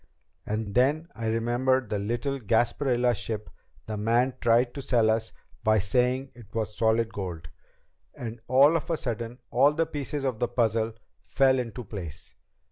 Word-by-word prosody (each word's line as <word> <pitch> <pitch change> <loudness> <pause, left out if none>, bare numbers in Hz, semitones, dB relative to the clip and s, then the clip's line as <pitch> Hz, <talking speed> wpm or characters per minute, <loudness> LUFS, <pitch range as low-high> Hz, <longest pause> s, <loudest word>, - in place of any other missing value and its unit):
And 105 -1 -2
then 145 - +2
I 115 -1 -4
remembered 120 +3 +1
the 105 - -1
little 120 +7 -2
Gasparilla 120 +2 +2
ship 105 +1 -5 0.3
the 110 -1 -4
man 120 +5 +2
tried 120 +1 +3
to 140 - -5
sell 115 -4 +3
us 110 0 -1 0.3
by 110 -1 +4
saying 125 +6 +1
it 120 -4 -15
was 110 -2 -2
solid 115 0 +1
gold. 85 -5 -5 0.7
And 115 -1 -7
all 140 +5 +6
of 165 - -2
a 165 - +1
sudden 115 -1 -4
all 140 +4 +5
the 165 +2 +1
pieces 145 -2 -4
of 130 -5 -1
the 120 - +1
puzzle 115 -2 0 0.3
fell 130 -1 +3
into 125 0 -5
place. 90 -7 -8
120 Hz, 160 wpm, -27 LUFS, 110-130 Hz, 0.7 s, all